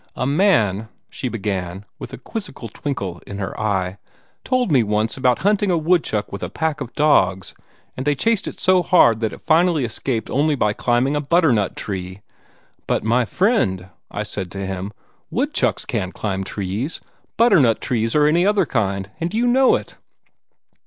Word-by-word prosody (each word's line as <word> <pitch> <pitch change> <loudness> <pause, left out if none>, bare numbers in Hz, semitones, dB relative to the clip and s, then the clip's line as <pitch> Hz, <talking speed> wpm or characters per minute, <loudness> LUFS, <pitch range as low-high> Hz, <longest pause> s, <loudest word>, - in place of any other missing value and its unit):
"A 125 - -2
man," 125 - +2 0.2
she 125 - -4
began, 95 -3 -4
with - - -8
a - - -7
quizzical 135 - -7
twinkle 100 -9 -5
in 100 - -6
her 95 -1 -4
eye, 95 -3 -1 0.4
"told 255 -7 0
me 135 -4 +5
once 105 +1 0
about 125 0 +1
hunting 205 -1 +2
a 175 - +2
woodchuck 160 - 0
with 100 - -6
a - - -3
pack 160 -2 -2
of 125 -3 -7
dogs, 125 - +2 0.4
and 130 - -4
they 145 +1 +1
chased 225 +9 +1
it - - -7
so 185 -1 +4
hard 140 - +4
that 110 -2 -1
it - - -11
finally 165 -3 +3
escaped 115 0 -3
only 150 +2 +2
by 105 -5 +1
climbing 125 +5 +1
a 145 - 0
butternut 140 - +2
tree. 95 -1 -5 0.7
'But, - - 0
my 120 +3 +2
friend,' 105 - 0 0.2
I 105 - -4
said 100 -3 -5
to 100 0 -4
him, 95 +1 -4 0.4
'woodchucks - - 0
can't 95 0 -3
climb 95 -3 -2
trees 100 - -4 0.4
butternut 175 - +4
trees 115 0 -1
or 150 -1 +4
any 165 +4 +3
other 200 -1 +3
kind 100 -6 -2
and 170 +1 -2
you 235 +2 +2
know 255 +2 +4
it!' - - -6
120 Hz, 175 wpm, -21 LUFS, 100-165 Hz, 0.7 s, me